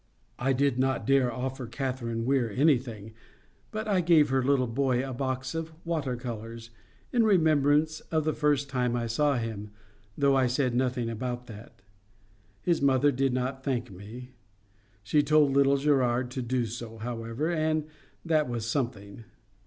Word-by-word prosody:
I 135 +2 +1
did 135 -1 +1
not 130 0 0
dare 135 -2 +3
to 115 - -6
offer 130 0 -4
Catherine 120 -3 -3
Weir 130 -3 +1
anything, 120 -5 0 0.6
but 215 0 -4
I 195 -3 +2
gave 165 -4 +4
her 130 -1 +1
little 135 -1 +2
boy 130 +1 0
a 130 - -5
box 130 0 -3
of 165 0 -4
water 155 -7 -1
colours—in 115 - -5
remembrance 155 -5 +3
of 160 -1 +1
the 155 0 0
first 145 -2 +1
time 125 -3 0
I 120 -1 -1
saw 140 +4 +1
him, 110 -3 -4 0.5
though 140 -1 +3
I 130 -1 +3
said 125 0 0
nothing 125 -1 0
about 120 +2 -4
that. 105 -3 -13 0.8
His 170 -4 +1
mother 140 +1 +4
did 135 0 +1
not 130 +1 -2
thank 125 -6 -2
me. 110 +7 -10 0.7
She 145 +9 +3
told 150 -1 +4
little 140 0 +4
Gerard 130 -3 +1
to 130 - -3
do 125 0 -1
so, 115 0 -7
however, 115 +6 -3
and 155 -2 0 0.4
that 155 -5 +2
was 120 -2 -3
something. 115 -4 -3
130 Hz, 160 wpm, -28 LUFS, 120-145 Hz, 0.8 s, gave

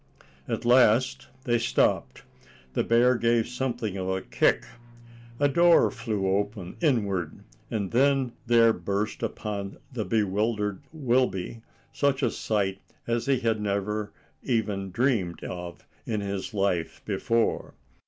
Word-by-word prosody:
At - - -3
last 120 0 +4 0.2
they 120 -1 +1
stopped. 65 - +1 0.5
The - - +1
bear 120 +2 +4
gave 115 -1 +2
something 120 -5 -3
a 95 0 -1
kick, - - +2 0.7
a 145 - +4
door 170 +4 +5
flew 115 -6 -3
open 100 -3 -4
inward, 100 - 0 0.3
and 105 -5 -2
then 135 +1 +3 0.2
there 115 -1 +5
burst 100 +4 -3
upon 100 -2 -4 0.2
the 115 -3 -2
bewildered 105 +1 0
Wilby 125 - 0 0.3
such 140 -1 +1
a 120 - +2
sight 100 -3 -1 0.2
as 115 +2 -1
he 135 -2 +2
had 110 -2 0
never 105 +1 -2 0.3
even 105 -6 -1
dreamed 100 -5 0
of 90 -1 -7 0.2
in 110 -2 -1
his 100 -1 -4
life 95 -5 -1
before. 115 0 0
110 Hz, 125 wpm, -27 LUFS, 100-120 Hz, 0.7 s, door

